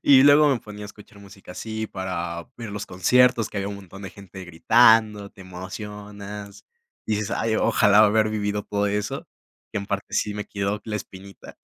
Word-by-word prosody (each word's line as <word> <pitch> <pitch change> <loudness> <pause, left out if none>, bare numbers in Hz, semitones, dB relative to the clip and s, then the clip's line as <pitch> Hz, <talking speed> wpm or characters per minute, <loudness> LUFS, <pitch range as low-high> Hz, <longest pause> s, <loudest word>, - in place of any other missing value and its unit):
Y 135 -2 +7
luego 145 +1 +7
me 130 -4 +2
ponía 105 -1 -9
a - - -6
escuchar 105 0 -15
música 95 -2 -13
así 110 +2 -5
para 85 -3 -5
ver 115 -3 -7
los 105 0 -5
conciertos, 120 +5 +3
que - - -9
había 100 +1 -2
un 100 - -6
montón 95 0 -12
de 95 - -7
gente 95 0 -11
gritando, 105 +3 +4
te 95 - -18
emocionas, 100 +2 -9 0.4
dices: 105 -1 -1
"Ay, 110 -1 0
ojalá 105 -1 +4
haber 110 +1 +3
vivido 105 -1 -2
todo 105 0 -1
eso", 105 0 -3 0.5
que 105 - -1
en 100 - -6
parte 100 0 -4
sí 105 0 0
me 105 - -4
quedó 100 +1 -3
la 105 -1 -3
espinita. 95 0 -11
105 Hz, 185 wpm, -24 LUFS, 100-110 Hz, 0.5 s, Y